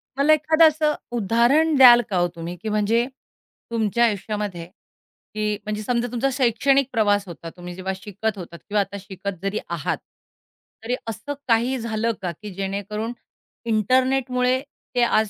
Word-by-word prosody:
मला 280 +3 +5
एखादं 315 +2 +5
असं 305 0 +1 0.2
उदाहरण 240 +9 +3
द्याल 240 -2 +9
का 190 - 0
हो 175 - +3
तुम्ही, 170 +1 -6
की 220 - -3
म्हणजे 215 +3 +2 0.7
तुमच्या 230 +1 +2
आयुष्यामध्ये, 205 -4 -3
की 210 +2 -7
म्हणजे 215 0 -3
समजा, 240 +2 0
तुमचा 250 +3 0
शैक्षणिक 265 +1 +2
प्रवास 205 -3 +2
होता, 170 -1 -8
तुम्ही 175 0 -8
जेव्हा 190 +1 -3
शिकत 205 +2 -4
होतात 170 -2 -9
किंवा 205 0 +2
आता 200 +1 -5
शिकत 190 -1 -6
जरी 195 +2 -1
आहात, - - -2 0.9
तरी 245 +2 -1
असं 225 +6 -4
काही 240 +3 +2
झालं 225 0 -1
का, 180 -2 -2
की 210 -2 -8
जेणेकरून 200 +4 -4 0.5
इंटरनेटमुळे 255 +3 +2 0.4
ते 245 - +3
आज 220 -2 +2
220 Hz, 150 wpm, -23 LUFS, 200-250 Hz, 0.9 s, द्याल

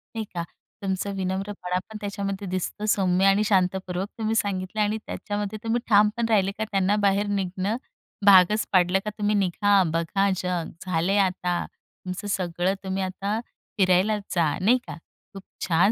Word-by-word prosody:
नाही 220 -1 -2
का. 170 -1 -2 0.4
तुमचं 195 +1 -2
विनम्रपणा 190 -1 -2
पण 220 - -7
त्याच्यामध्ये 200 -1 -4
दिसतं 185 +3 -3
सौम्य 190 -2 +2
आणि 195 +2 +4
शांतपूर्वक 190 -1 0
तुम्ही 220 0 -1
सांगितलं 200 0 -1
आणि 210 +1 +1
त्याच्यामध्ये 205 0 -4
तुम्ही 230 +1 0
ठाम 210 0 +6
पण 235 - +1
राहिले 195 -3 +3
का 220 - -1
त्यांना 195 +1 +2
बाहेर 200 +1 +2
निघणं 195 +2 -1 0.5
भागच 200 +2 +6
पाडलं, 185 0 +4
का - - -1
तुम्ही 210 0 +1
निघा, 200 +1 +3
बघा 195 +4 +1
जग, 180 -3 -2
झाले 185 +3 +1
आता 180 -2 +1
तुमचं 185 +3 -9
सगळं. 180 -1 0
तुम्ही 190 0 -2
आता 200 +4 -2 0.4
फिरायला 190 +3 +3 0.2
जा, 165 -3 +3
नाही 235 +6 +5
का. - - -6 0.4
खूप 195 -1 -9 0.2
छान 180 +5 +4
195 Hz, 155 wpm, -25 LUFS, 185-205 Hz, 0.5 s, ठाम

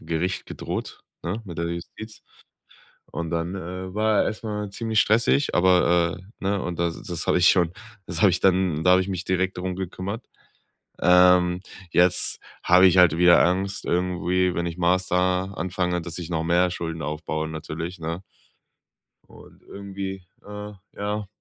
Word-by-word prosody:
Gericht 85 +3 -3
gedroht, - - -6 0.2
ne, 100 +7 -4
mit 85 -5 -8
der 85 - -1
Justiz. 100 +5 -8 0.9
Und 85 -1 -4
dann, 85 +2 -2
äh, 90 0 -6
war 110 0 +2
er - - +3
erst 110 - -4
mal 105 -2 -4
ziemlich 110 +1 0
stressig, 115 +7 +2
aber, 90 -1 +3
äh, 95 +1 -15
ne, 100 0 0
und 90 -2 -4
das 85 -1 -2
das 85 -3 -5
habe - - +3
ich 90 - +5
schon 85 -2 +2 0.3
das 85 -1 -3
hab 100 - +7
ich 90 - -1
dann 90 -4 +2
da 90 - +5
habe 95 - +5
ich 95 - -3
mich 95 -1 -3
direkt 95 0 -1
drum 90 0 -3
gekümmert. 95 +4 -5 0.8
Ähm, 90 0 +5 0.3
jetzt 90 0 +3 0.2
hab 90 +1 +5
ich 95 -1 +6
halt 90 -2 +6
wieder 90 0 +6
Angst, 95 +3 -1
irgendwie, 90 0 0
wenn 85 - -1
ich 85 0 -5
Master 90 +1 +1
anfange, 90 -1 -2
dass 85 0 -7
ich 85 -1 -6
noch 80 -1 -1
mehr 90 +1 +2
Schulden 80 -2 -5
aufbaue, 80 +1 -3
natürlich, 80 +3 -6
ne? 85 +3 -5 1.1
Und - - -17
irgendwie, 95 -1 -7 0.2
äh, 105 0 -8 0.2
ja 105 0 -3
90 Hz, 165 wpm, -24 LUFS, 85-95 Hz, 1.1 s, hab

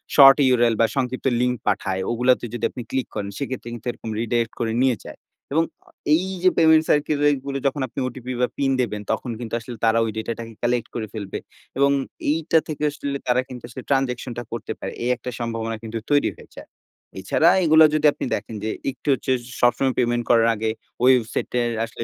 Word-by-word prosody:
Short 135 -1 +9 0.2
URL 120 -2 +3
বা - - +6
সংক্ষিপ্ত 130 -1 -2 0.2
link 125 0 +2
পাঠায়, 95 -2 0
ওগুলাতে 125 +2 +2
যদি 120 - -2
আপনি 125 - -7
ক্লিক 130 -1 -1
করেন, 100 -1 -3
সেক্ষেত্রে 130 -3 -4
কিন্তু 120 +1 -9
এরকম 115 - -9
রিডাইরেক্ট 115 0 0
করে 115 -1 0
নিয়ে 130 -4 +2
যায়। - - -10 0.3
এবং 160 +2 +4 0.5
এইযে 185 +1 +1
পেমেন্ট 160 -1 +6
সার্কেলেরগুলো 145 -2 +1
যখন 135 +1 -2
আপনি 115 - -7
OTP 125 0 -9
বা 125 - +3
পিন 135 -1 +1
দেবেন 105 -4 -2
তখন 120 +2 -2
কিন্তু 115 -2 -7
আসলে 120 +1 -9
তারা 115 +1 +4
ওই 110 - -2
ডেটাটাকে 115 +1 -5
কালেক্ট 120 -1 +1
করে 110 -2 -3
ফেলবে। 100 -4 -5 0.4
এবং 140 +1 +4 0.4
এইটা 165 +1 +2
থেকে 150 -1 -4
আসলে 140 -1 -4
তারা 125 +1 +3
কিন্তু 125 -1 -9
আসলে 125 +2 -8
ট্রান্সেকশন 130 -2 0
টা 120 - -3
করতে 115 - -5
পারে। - - -5
এই 120 - 0
একটা 125 +1 -7
সম্ভাবনা 115 -1 -3
কিন্তু 115 0 -5
তৈরি 145 0 +4
হয়ে - - -16
যায়। - - -10 0.5
এছাড়া 155 - +3
এগুলা 160 -1 +7
যদি 155 0 +1
আপনি - - -4
দেখেন 110 +2 -6
যে 110 - -1 0.2
একটু 130 - -18
হচ্ছে 130 0 -2 0.3
সবসময় 125 +2 +3
পেমেন্ট 120 -1 +1
করার 115 -1 +5
আগে 110 +1 -1 0.3
ওয়েবসাইটের 125 -1 +2 0.2
আসলে 115 0 -7
125 Hz, 190 wpm, -23 LUFS, 115-140 Hz, 0.5 s, Short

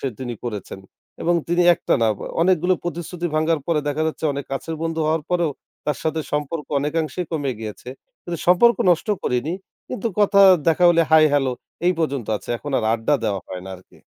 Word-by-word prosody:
সে 135 - -1
তিনি 120 -2 -4
করেছেন। 105 -4 -6 0.4
এবং 175 +1 +2
তিনি 175 +1 +2
একটা - - 0
না 115 - +4
অ - - -9 0.2
অনেকগুলো 180 0 +3
প্রতিশ্রুতি 175 0 -4
ভাঙ্গার 155 0 +1
পরে 165 -3 +1
দেখা 150 +2 -1
যাচ্ছে 160 0 -4
অনেক 140 0 -5
কাছের 160 +4 -3
বন্ধু 165 0 -2
হওয়ার 160 0 +1
পরেও, 175 -3 +1 0.4
তার 150 -2 -1
সাথে 160 0 -1
সম্পর্ক 150 +1 -2
অনেকাংশেই 155 +3 -2
কমে 145 -4 -1
গিয়েছে। 110 +2 -7 0.3
কিন্তু 170 -1 -5
সম্পর্ক 200 +6 +5
নষ্ট 175 +5 +1
করিনি। 125 +6 -1 0.4
কিন্তু 220 - -4
কথা, 200 -1 +4 0.3
দেখা 165 +2 +3
হলে 170 -1 +4
হাই 160 -1 +7
হ্যালো 135 -3 +2 0.3
এই 180 - +5
পর্যন্ত 140 -8 -1
আছে। - - -13
এখন 145 - -7
আর - - -2
আড্ডা 115 +6 +1
দেওয়া 100 -2 -1
হয় 90 -1 -6
না 95 - -8
আরকি। 90 - -21
155 Hz, 190 wpm, -22 LUFS, 135-170 Hz, 0.4 s, হাই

